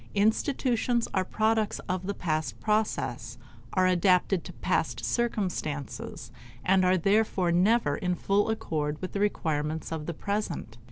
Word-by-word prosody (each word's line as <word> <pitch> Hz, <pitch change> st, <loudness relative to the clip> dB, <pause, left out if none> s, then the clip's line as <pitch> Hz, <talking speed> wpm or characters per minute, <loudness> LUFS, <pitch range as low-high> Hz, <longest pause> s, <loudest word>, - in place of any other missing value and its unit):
Institutions 235 Hz, +2 st, +1 dB
are 190 Hz, -, +2 dB
products 215 Hz, +2 st, +1 dB
of 185 Hz, 0 st, -2 dB
the 200 Hz, -, -2 dB
past 155 Hz, -6 st, -2 dB
process, 215 Hz, 0 st, -1 dB, 0.4 s
are 185 Hz, -1 st, +3 dB
adapted 180 Hz, 0 st, +3 dB
to -, -, -8 dB
past -, -, -1 dB
circumstances, 195 Hz, -, -2 dB, 0.3 s
and 190 Hz, 0 st, +4 dB
are 185 Hz, +1 st, +4 dB
therefore 195 Hz, -1 st, +2 dB
never 210 Hz, +7 st, +3 dB
in 180 Hz, -3 st, -1 dB
full 200 Hz, +4 st, +1 dB
accord 150 Hz, -8 st, -2 dB
with 185 Hz, -, -5 dB
the 200 Hz, -, -1 dB
requirements 160 Hz, -6 st, -1 dB
of 160 Hz, -2 st, -4 dB
the 170 Hz, -, -2 dB
present. 200 Hz, -, -3 dB
190 Hz, 135 wpm, -28 LUFS, 165-215 Hz, 0.4 s, and